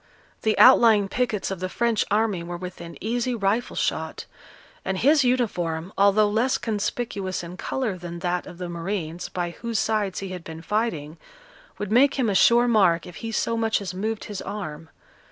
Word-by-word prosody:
The 220 -1 +1
outlying 225 -5 +7
pickets 220 -2 -1
of 190 - -4
the 185 0 -3
French 235 +1 +1
army 210 -3 +1
were 175 +1 -6
within 170 -3 -8
easy 240 +3 -1
rifle 215 +3 0
shot; - - -2 0.6
and 190 - -2
his 285 +7 +4
uniform, 185 -9 -1
although 200 +1 +4
less 225 +5 +1
conspicuous 205 -3 -3
in 170 +1 -8
colour 215 -1 -3
than 170 0 -7
that 175 0 -2
of 180 - -10
the 180 0 -5
marines, 170 -1 -4
by 175 -1 -3
whose 230 +5 -4
sides 210 -2 0
he 195 - -4
had 180 -2 -7
been 160 0 -9
fighting, 170 -8 -2 0.6
would 205 -1 -4
make 270 +5 +5
him 245 -6 +1
a - - 0
sure 235 +5 +5
mark 190 -8 +3
if 180 - -10
he 225 - -5
so 230 +1 0
much 225 -1 +1
as 190 -3 -5
moved 215 +4 -3
his 205 -2 -6
arm. 160 -6 -6
200 Hz, 180 wpm, -24 LUFS, 175-225 Hz, 0.6 s, outlying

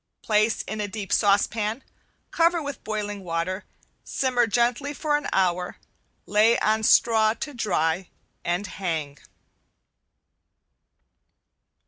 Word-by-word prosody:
Place 215 +1 +2
in 215 0 -4
a 205 - -2
deep 205 -1 -5
saucepan, 215 +3 +1 0.5
cover 335 +1 +3
with 285 -3 -6
boiling 205 -2 -4
water, 175 +3 -3 0.4
simmer 250 -3 +1
gently 245 +6 0
for 300 0 0
an 295 - -2
hour, 180 -1 0 0.5
lay 215 +3 +4
on 220 +1 +1
straw 220 0 +4
to 300 +1 -6
dry 180 - 0 0.3
and 175 +4 -1
hang. 160 -8 -4
215 Hz, 105 wpm, -25 LUFS, 190-240 Hz, 0.5 s, lay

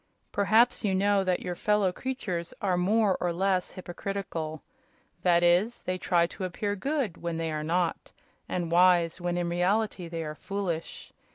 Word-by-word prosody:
Perhaps 220 +5 +3
you 195 -3 +1
know 200 +1 +3
that 185 -1 0
your 180 - -3
fellow 210 +1 +2
creatures 185 -5 -4
are 195 -6 +1
more 200 +2 +3
or 175 - +1
less 185 +1 0
hypocritical. 175 -4 -5 0.6
That 175 -1 +4
is, 180 +7 +3
they 185 0 -2
try 175 -2 +3
to 180 - -7
appear 205 +3 -2
good 270 - -2
when 170 -1 -3
they 165 -1 -2
are 155 0 -3
not, 170 +2 -1 0.4
and 175 -2 -2
wise 175 -1 +4
when 175 0 -1
in 175 -1 0
reality 180 +2 0
they 165 -1 -4
are 155 -1 -5
foolish. 175 -1 -5
180 Hz, 165 wpm, -28 LUFS, 170-200 Hz, 0.6 s, That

